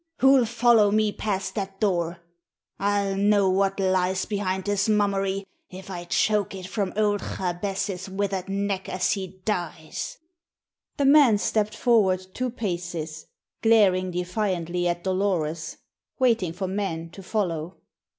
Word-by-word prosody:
Who'll 265 -2 +5
follow 235 -2 +4
me 215 0 +2
past 200 -2 -3
that 195 -2 -5
door? 175 -4 0 0.6
I'll 200 -1 +1
know 200 -1 +3
what 195 +1 +1
lies 185 0 +1
behind 190 -2 -2
this 205 +1 +1
mummery 195 -2 +1 0.2
if 190 +1 -10
I 175 -1 -6
choke 205 +3 +1
it 185 -1 -7
from 190 0 -2
old 205 -1 +2
Jabez's 190 +1 -3
withered 195 -1 -2
neck 195 -1 -2
as 185 - 0
he 190 -2 -4
dies." 170 -6 -3 0.8
The 280 - +1
man 275 -6 +6
stepped 215 +1 0
forward 200 -6 +3
two 255 0 -2
paces, 175 -8 -4 0.3
glaring 200 -5 +4
defiantly 180 -1 -1
at 175 0 -2
Dolores, 175 -5 -1 0.4
waiting 230 -9 +2
for 190 +2 -3
men 180 -4 -3
to 195 - -10
follow. 180 -4 -2
195 Hz, 130 wpm, -25 LUFS, 180-210 Hz, 0.8 s, man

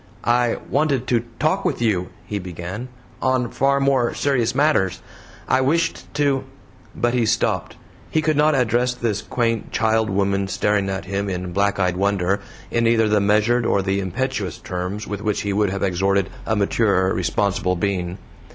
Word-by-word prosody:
"I 120 0 +2
wanted 140 -2 +1
to 120 -1 +1
talk 155 +5 +1
with 180 -7 -1
you," 100 -6 +1 0.2
he 105 - -3
began, 90 +6 -6 0.3
"on 130 -2 +1
far 140 +1 +2
more 135 -3 +2
serious 125 -4 +1
matters. 135 - +2 0.5
I 130 - +3
wished 165 +6 0
to 140 -2 +1 0.3
" - - -27
but 120 0 0
he 120 -3 +2
stopped. 110 -5 0 0.3
He 160 - +1
could 155 0 +2
not 150 +1 +4
address 125 0 +1
this 110 -4 -1
quaint 115 -1 -1
child 110 -1 +1
woman 100 0 0
staring 100 0 0
at 95 0 -3
him 100 +1 -2
in 90 -1 -4
black 100 +1 +1
eyed 90 -1 +1
wonder, 100 0 +1 0.3
in 115 -1 +2
either 115 -1 +3
the 105 -1 +3
measured 105 +4 +3
or 100 -3 +1
the 95 +1 0
impetuous 100 -1 -2
terms 90 +4 -4
with 105 0 -5
which 105 -1 -1
he 100 -1 -2
would 105 0 +2
have 100 +1 -3
exhorted 95 +1 +1 0.2
a 110 - +1
maturer 100 -2 +2
responsible 95 -1 0
being. 90 -1 -2
105 Hz, 170 wpm, -22 LUFS, 95-125 Hz, 0.5 s, not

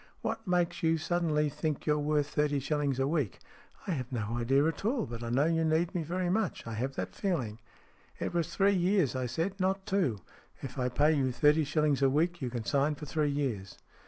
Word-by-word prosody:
" - - -34
What 225 - -3
makes 175 -1 +1
you 165 0 +3
suddenly 160 -2 +1
think 150 0 -3
you're 150 -1 +2
worth 150 0 +1
thirty 150 -1 +1
shillings 140 -1 0
a 135 0 +1
week? 145 - -1 0.2
" - - -24
" - - -23
I - - 0
have 130 -6 -3
no 110 -4 -2
idea 135 +4 +2
at 160 +2 -1
all, 230 +1 +1
but 115 -1 -7
I 115 - -4
know 130 +5 +3
you 165 0 +2
need 160 +3 +1
me 175 - -1
very 175 +3 -2
much. 200 +1 -1
I 115 - -5
have 130 +5 -3
that - - -4
feeling." 130 - -2 0.3
" - - -31
It - - -3
was 170 -1 0
three 200 0 +4
years 180 -6 +2
I 130 -1 -1
said, 170 - -2
not 190 +1 0
two. 190 - +1 0.5
If 135 0 -6
I 125 0 +1
pay 150 +5 +3
you 135 -4 +1
thirty 150 +4 +4
shillings 150 -1 +1
a 135 - +5
week, 165 +4 +1
you 130 - -1
can 120 -2 -4
sign 140 +6 +1
for 150 - -8
three 150 0 0
years." 125 -10 -2
150 Hz, 235 wpm, -30 LUFS, 135-170 Hz, 0.5 s, a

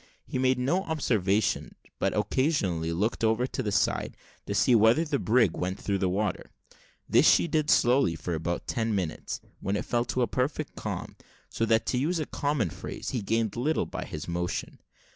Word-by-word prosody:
He 130 - -3
made 130 0 +3
no 140 +9 +1
observation, 110 - 0 0.2
but - - 0
occasionally 95 - 0
looked 105 +8 -1
over 110 +2 +2
the 125 -4 -3
side, - - 0 0.3
to - - -2
see 125 - +4
whether 115 +8 +5
the 145 -3 -1
brig 110 -6 +3
went 90 +1 -3
through 100 -1 -1
the 95 - +1
water. 105 +3 -2 0.6
This - - +5
she - - +4
did 155 -1 0
slowly 120 -8 +4
for 85 +2 -4
about 85 +2 -2
ten 110 -2 -1
minutes, 90 -5 -3 0.2
when 100 - -2
it - - -2
fell 120 0 0
a 125 - +4
perfect 130 +6 -2
calm - - -5 0.3
so 115 - -1
that, 110 0 +3
to 125 - 0
use 165 +7 0
a 155 - -1
common 140 - -1
phrase, - - -6
he 125 - -2
gained 110 0 0
little 145 +7 0
by - - -5
his 75 - -7
motion. 90 0 -3
115 Hz, 180 wpm, -28 LUFS, 95-130 Hz, 0.6 s, whether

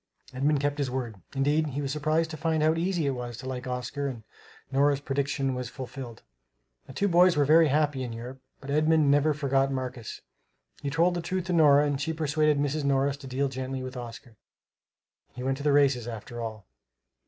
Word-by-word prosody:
Edmund 140 +3 +1
kept 145 +1 -1
his 140 -2 0
word. 125 -4 -4 0.2
Indeed, 145 +3 +2
he 145 0 -3
was 135 - -2
surprised 155 +2 0
to - - -5
find 160 0 0
how 155 +1 +4
easy 170 0 0
it 140 - +1
was 120 -3 -5
to 130 - -9
like 130 -1 -5
Oscar; 125 +3 -3
and 120 -5 -6 0.5
Nora's 140 +1 +3
prediction 135 -1 -1
was 125 -2 -4
fulfilled. 130 -3 -8 0.6
The 130 - -10
two 200 - +1
boys 175 -2 +5
were 145 - +4
very 160 +3 +6
happy 145 -1 +1
in 125 -2 -4
Europe; 125 +3 -8 0.2
but 140 0 -6
Edmund 155 -1 +3
never 145 +2 +4
forgot 135 -2 +1
Marcus. 130 -3 -5 0.6
He 140 - -2
told 165 +4 +2
the 175 - -2
truth 185 +2 -2
to 180 - -2
Nora 150 -3 +6
and 145 -1 -1
she 160 +3 -1
persuaded 155 -1 +1
Mrs. 145 +1 -1
Morris 140 0 +1
to 140 - -10
deal 135 +2 0
gently 130 0 -4
with 130 +1 -7
Oscar. 120 -1 -9 1.0
He 125 - -6
went 135 0 0
to 140 - -7
the 150 - +3
races, 140 -4 +3
after 120 +1 -7
all. 110 -3 -6
140 Hz, 200 wpm, -27 LUFS, 130-150 Hz, 1.0 s, very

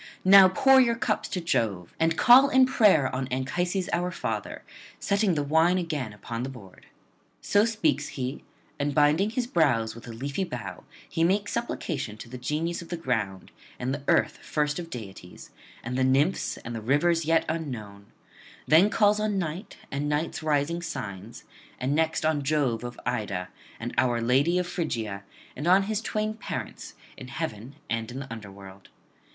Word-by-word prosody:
Now 195 0 +9
pour 265 +7 +5
your 235 -2 +2
cups 230 - -1
to 185 - -2
Jove, 105 - -1
and 165 0 +2
call 260 +7 +7
in 260 -1 +5
prayer 200 - +4
on 130 0 -2
Anchises 175 +9 -1
our 175 +1 0
father, - - -4 0.4
setting 200 -3 +1
the 145 - 0
wine 160 +5 +3
again 155 - -3
upon 115 +3 -6
the 130 - -3
board.' 105 -8 -13 0.5
So 205 +1 +3
speaks 215 - 0
he, 130 +2 -4 0.4
and 145 0 -1
binding 155 +7 +4
his 245 +2 -2
brows 130 - +1
with 115 +1 -12
a - - -6
leafy 140 +9 -3
bough, 125 - -7 0.2
he 165 - -1
makes 200 +4 +1
supplication 160 - -3
to 110 - -10
the 125 +1 -8
Genius 155 +7 -2
of 170 - -11
the 175 - -3
ground, 110 - -3 0.3
and 135 +4 -3
Earth - - +2
first 150 +1 -1
of 170 -1 -7
deities, 95 - -10 0.3
and 125 +2 -4
the 130 - +1
Nymphs, 140 +8 +1
and 120 - -8
the 115 - -5
Rivers 155 +7 +2
yet 165 +1 +2
unknown; 110 -11 -5 0.6
then 165 +7 +6
calls 210 -1 +3
on 210 -1 0
Night 180 +3 -4
and 145 +1 -2
Night's 150 +2 -2
rising 155 +2 0
signs, 105 - -7 0.4
and 130 +3 0
next 160 0 +1
on 155 -2 +1
Jove 135 -5 0
of 120 0 -7
Ida, 105 -7 -2 0.3
and 120 +1 -5
our 120 -2 +2
lady 135 +9 +2
of 180 - 0
Phrygia, 115 - -3 0.3
and 145 +5 -4
on 190 +2 +5
his 215 +1 -2
twain 215 -1 -2
parents, 215 - -7 0.2
in 130 - -9
heaven 130 -4 -5
and 115 0 -2
in 125 - -7
the 135 -3 -6
under 105 -3 -9
world. 95 0 -13
150 Hz, 175 wpm, -27 LUFS, 120-180 Hz, 0.6 s, Now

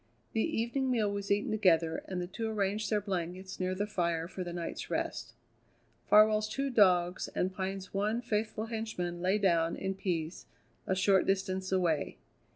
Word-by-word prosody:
The 225 - +1
evening 240 +5 0
meal 220 -5 +1
was 200 0 -4
eaten 205 +1 +1
together, 165 -6 +2
and 185 -1 -3
the 175 - -2
two 220 +5 -4
arranged 205 0 -1
their 210 - +2
blankets 185 -1 -4
near 185 0 -1
the 205 +2 -1
fire 170 -5 -1
for 185 +1 -5
the 175 - -5
night's 170 -1 -5
rest. - - -3 0.8
Farwell's 215 0 +6
two 275 +4 -2
dogs 180 -5 +3
and 185 +1 0
Pine's 190 0 -4
one 210 +4 0
faithful 220 -2 -2
henchman 220 -7 -4
lay 185 +3 +2
down 170 -5 +2
in 190 0 -2
peace 175 -3 -3 0.4
a 190 - +1
short 190 0 +3
distance 190 -1 0
away. 170 -6 +1
195 Hz, 165 wpm, -31 LUFS, 180-215 Hz, 0.8 s, Farwell's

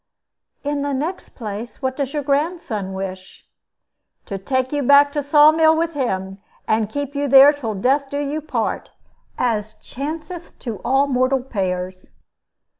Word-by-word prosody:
"In 290 0 -1
the 285 -1 -1
next 320 +8 -4
place, 220 0 -7
what 260 -1 -2
does 275 -2 -2
your 295 -2 -2
grandson 280 - -1
wish?" 190 -1 -7 0.8
"To 195 -2 -5
take 260 +5 -1
you 290 -1 0
back 285 +2 +6
to 295 - 0
Saw 295 +2 +6
mill 320 0 +4
with 335 0 -1
him, 195 -8 -3 0.3
and 220 -1 +1
keep 285 +3 -4
you 285 0 -1
there 275 +2 +8
till 230 -7 -4
death 270 +7 +1
do 285 - -3
you 290 +2 -2
part, 310 - -3 0.5
as 220 -3 -1
chanceth 320 +5 -6
to 230 -5 -4
all 270 +3 +3
mortal 255 -1 +1
pairs." 185 -5 -4
270 Hz, 155 wpm, -21 LUFS, 220-290 Hz, 0.8 s, there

